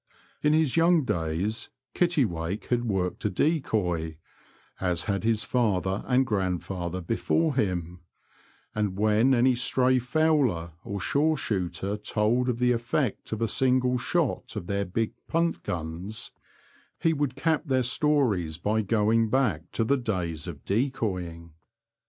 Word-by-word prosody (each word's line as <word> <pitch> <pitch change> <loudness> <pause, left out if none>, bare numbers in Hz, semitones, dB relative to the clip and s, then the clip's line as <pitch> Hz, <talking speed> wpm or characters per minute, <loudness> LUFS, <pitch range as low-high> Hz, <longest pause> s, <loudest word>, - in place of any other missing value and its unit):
In 150 0 +3
his 155 -4 +2
young 165 -2 +4
days 85 +3 -2 0.2
Kittiwake 105 - 0
had 120 -1 +1
worked 95 -5 -1
a 105 - +1
decoy, 90 - 0 0.6
as 90 -3 +1
had 100 -1 -1
his 110 -1 +2
father 100 -5 0
and 130 +1 +3
grandfather 95 -3 -2
before 145 - +1
him; 90 -8 -1 0.7
and 105 -3 -1
when 110 +5 +4
any 125 +2 +4
stray 130 +1 +2
fowler 125 - +1
or 100 0 -4
shore 150 - +1
shooter 100 -2 -2
told 110 +4 +1
of 120 - 0
the 125 0 +3
effect 120 +1 -1
of 110 +1 -2
a - - +2
single 125 +1 +2
shot 145 0 -1
of 105 -5 -4
their 100 +2 -1
big 110 +5 -2
punt 165 0 0
guns, 85 +6 -5 0.7
he 165 - +2
would 145 -4 -1
cap 160 +3 0
their 130 -2 +2
stories 120 - +1
by 105 +5 0
going 110 +1 +2
back 105 - 0
to 115 - +1
the 140 +5 +2
days 90 - -3
of 75 -5 -8
decoying. 95 - -2
110 Hz, 140 wpm, -27 LUFS, 90-130 Hz, 0.7 s, young